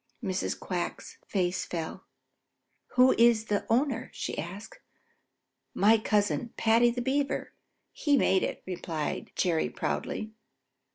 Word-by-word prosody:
Mrs. 190 -2 -2
Quack's 180 -2 -4
face 180 -2 0
fell. 165 -2 -5 0.9
"Who 255 +1 +6
is 230 -2 +5
the 205 -2 -1
owner?" 245 +1 +1
she - - -3
asked. 195 - -7 1.0
"My 220 +3 +5
cousin, 210 +2 0
Paddy 230 +2 +4
the 245 +1 -3
Beaver. 275 +2 -1 0.4
He 290 -2 +2
made 190 -7 +3
it," - - -3
replied 170 -4 -4
Jerry 170 -4 +1
proudly. 215 0 -3
215 Hz, 115 wpm, -29 LUFS, 185-240 Hz, 1.0 s, Who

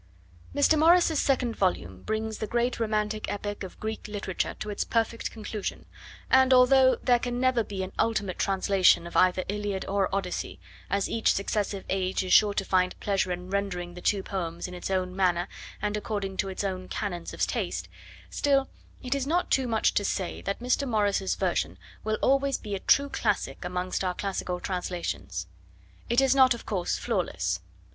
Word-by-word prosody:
Mr. 295 +2 +4
Morris's 330 -1 +5
second 255 -4 +1
volume 95 - -1
brings 220 - -3
the 215 - -3
great 240 +3 0
romantic 215 -1 -1
epic 205 0 -4
of 190 - -8
Greek 220 0 -4
literature 205 -3 -3
to 210 - -5
its 205 - -1
perfect 230 0 -1
conclusion, 215 -2 -5 0.5
and 260 0 +6
although 260 +1 +6
there 245 -2 +4
can 245 0 -3
never 255 -2 +3
be 195 -2 -4
an 185 - -6
ultimate 210 -5 0
translation 195 -3 +3
of 170 - -9
either 185 0 +4
Iliad 205 -1 -2
or 195 -1 +1
Odyssey, 190 -2 -3 0.3
as 200 +1 +1
each 225 - +2
successive 200 0 -2
age 190 0 0
is 185 - 0
sure 205 -1 +6
to 195 - 0
find 185 -1 +1
pleasure 195 -2 0
in 180 +1 -5
rendering 180 -3 -2
the 180 - -9
two 195 +1 +1
poems 170 -3 -4
in 180 - -9
its 180 - -5
own 185 -1 -1
manner 180 -2 +2 0.4
and 210 0 0
according 205 -2 -3
to 195 - 0
its 190 - -4
own 185 -2 -3
canons 175 -5 -4
of - - 0
taste, - - -3 0.4
still 275 -1 +2 0.3
it 255 +1 -1
is 275 -1 -1
not 345 +4 0
too 265 -2 +3
much 225 -2 +2
to 205 - +1
say 190 -2 -2
that 200 - -3
Mr. 255 +3 +1
Morris's 205 -3 +1
version 95 - -1 0.3
will 215 0 0
always 275 0 +3
be 210 - -7
a 195 - -1
true 280 +8 +4
classic - - -1
amongst 180 +1 -2
our 180 -1 -1
classical 185 -2 -3
translations. 170 - -3 0.6
It 240 +3 +4
is 270 -1 +4
not, 260 -2 +6
of 235 - -11
course, 185 -4 -1
flawless. 95 - -1
200 Hz, 180 wpm, -27 LUFS, 185-230 Hz, 0.6 s, and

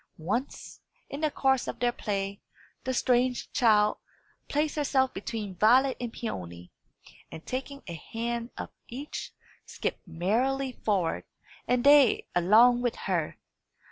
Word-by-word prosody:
Once, 235 - -4 0.3
in 280 - -5
the 310 - +2
course 265 -2 +1
of - - -4
their 245 0 +2
play, 200 -3 -3 0.4
the 260 - 0
strange 250 0 +1
child 215 -3 +4 0.5
placed 300 +1 0
herself 270 -3 +1
between 205 0 -5
Violet 250 +8 +4
and 240 -2 -3
Peony, 90 - -6 0.6
and 160 - -9
taking 275 +2 -5
a 170 - -6
hand 230 +7 -4
of - - -6 0.2
each, 275 +5 -6 0.3
skipped - - -5
merrily 245 +11 0
forward, 195 -8 -1 0.4
and 250 0 +2
they 285 -4 +6
along 225 +8 +5
with 245 -2 0
her. - - -1
240 Hz, 130 wpm, -28 LUFS, 205-265 Hz, 0.6 s, they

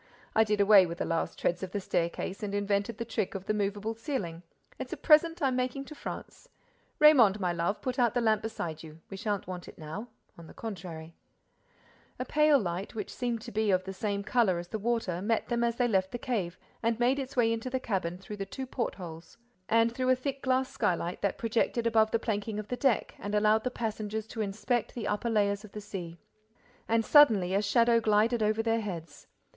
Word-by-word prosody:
I 220 - +5
did 210 -1 0
away 200 -2 +7
with 170 0 -6
the - - -2
last 165 0 -2
treads 175 0 0
of 190 -1 -6
the 205 - 0
staircase 180 +2 -2
and 205 -1 -3
invented 205 +2 0
the 230 - -4
trick 220 -4 -2
of 195 0 -5
the 215 - 0
movable 205 +1 -1
ceiling: 225 - -4 0.4
it's - - -6
a - - -3
present 330 +1 +4
I'm 265 -2 +2
making 255 +2 -2
to 305 - -9
France—Raymonde, 295 - +1
my 180 -3 0
love, 170 +4 -1
put 255 0 -2
out 240 -1 +3
the - - +3
lamp 220 -3 +2
beside 165 -8 -5
you—we 160 +4 -11
shan't 205 -1 -2
want 180 -1 -7
it - - -12
now—on 170 +1 -10
the - - -14
contrary—" 170 -7 -7 1.0
A 255 - -3
pale 300 +1 +4
light, 185 -3 -3
which 210 -3 -5
seemed 240 -3 -2
to - - -8
be 215 0 0
of 185 -1 +3
the 190 +1 -6
same 200 +1 -2
color 215 -5 +2
as 175 0 -6
the 220 - -3
water, 215 -6 -1
met 225 +2 0
them 235 -1 +1
as 235 -1 +1
they 245 0 +2
left 190 -4 +1
the - - -3
cave 210 -9 -2 0.2
and 230 0 0
made 255 +3 +3
its 270 0 -5
way 230 -2 +4
into 230 +3 -4
the 260 +1 -1
cabin 185 -7 -2
through 200 +3 -8
the 200 - -3
two 265 +6 -5
portholes 175 -10 -5 0.3
and 230 +1 +4
through 255 +1 -1
a 255 - +6
thick 270 +1 -4
glass 260 0 +1
skylight 175 -4 -1
that 200 - 0
projected 230 0 0
above 220 -1 +4
the 230 - +2
planking 215 -1 -3
of 210 -1 -5
the 250 - -1
deck 255 -2 +1
and 205 +1 -3
allowed 215 +1 +3
the 255 - 0
passengers 220 -2 -3
to 220 0 -5
inspect 215 +3 -1
the 230 -3 -3
upper 210 +3 -1
layers 205 -2 +1
of 215 - -13
the 210 - -5
sea. 185 -5 -7 0.7
And, 225 0 +2
suddenly, 215 -12 +6
a 200 - +3
shadow 230 +3 +4
glided 220 +2 +2
over 215 +1 +1
their 225 0 +1
heads. 170 -7 -7
215 Hz, 215 wpm, -30 LUFS, 195-235 Hz, 1.0 s, away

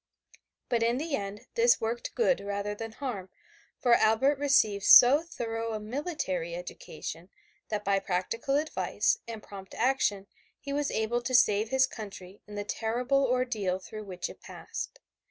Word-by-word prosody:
But 235 -1 +1
in 235 +2 +2
the 305 +1 -1
end 200 -1 -6
this 475 0 +4
worked 230 +2 -3
good 275 - +3
rather 200 +1 -3
than 225 +1 -7
harm, 220 -9 -5 0.5
for 245 - +3
Albert 250 +6 +3
received 220 -8 +3
so 265 +5 +9
thorough 230 -8 -4
a 215 - -3
military 210 - -3
education 175 0 -7 0.4
that 210 -1 -3
by 195 0 +3
practical 195 +8 -1
advice 315 +10 0
and 225 -2 -7
prompt 195 -2 -10
action 225 -6 +1 0.3
he 280 - -5
was 290 0 0
able 225 +2 0
to 255 +1 -1
save 215 -2 +4
his 265 +1 +4
country 200 -5 -10
in 210 - -9
the 205 - -3
terrible 245 +6 0
ordeal 245 -7 0
through 215 +3 -9
which 180 -2 -4
it - - -12
passed. - - -7
225 Hz, 155 wpm, -29 LUFS, 200-265 Hz, 0.5 s, so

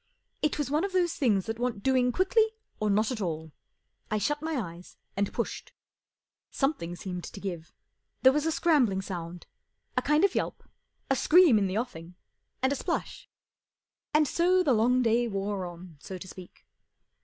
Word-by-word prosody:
It 300 - +1
was 290 -3 -2
one 305 +4 +2
of 395 -1 -2
those 355 -2 +2
things 210 -9 +1
that 225 +1 -4
want 240 -5 -2
doing 255 -2 +3
quickly 435 - +3 0.3
or 215 - 0
not 215 +4 +2
at 235 -4 -3
all. 160 -3 -3 0.6
I 215 - 0
shut 295 +8 -1
my 320 +1 -2
eyes 175 -5 -7 0.2
and 200 0 0
pushed. - - -4 0.8
Something 270 - -1
seemed 180 -1 -6
to - - -9
give. 175 -4 -6 0.5
There 260 - +8
was 300 +2 0
a - - +2
scrambling 265 - +2
sound, 175 -2 -6 0.5
a - - +2
kind 300 +3 +2
of 400 - +1
yelp, - - -2 0.5
a - - +4
scream 310 -2 +6
in 195 - +1
the 190 +2 -2
offing, 180 -7 -5 0.5
and 265 +1 +3
a - - -2
splash. - - -4 0.8
And 305 0 +4
so 365 +5 +3
the 275 - +3
long 245 +3 +3
day 235 +1 +2
wore 195 -2 -2
on, 175 -2 -11
so 190 +5 -7
to 185 - -10
speak. 185 -1 -13
225 Hz, 180 wpm, -28 LUFS, 185-295 Hz, 0.8 s, There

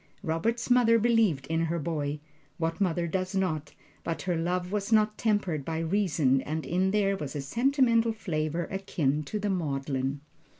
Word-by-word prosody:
Robert's 210 +10 -1
mother 235 -2 +5
believed 225 - +2
in 165 +2 0
her 165 +1 -1
boy 150 -2 -2 0.4
what 165 +3 -2
mother 175 -2 +1
does 185 +3 -2
not? 165 -6 -1 0.3
But 165 - -3
her 180 -2 0
love 180 +2 -1
was 205 +1 -2
not 215 -1 +4
tempered 205 -10 0
by 160 +3 -3
reason, 160 -6 +2
and 155 +3 -4
in 185 +2 +1
it - - +1
there 200 -2 +2
was 150 -5 -6
a 145 - -2
sentimental 235 - +2
flavor 165 -5 -2
akin 155 -7 -1
to 210 - -3
the 205 -1 -1
maudlin. 140 -5 -2
175 Hz, 170 wpm, -28 LUFS, 155-210 Hz, 0.4 s, mother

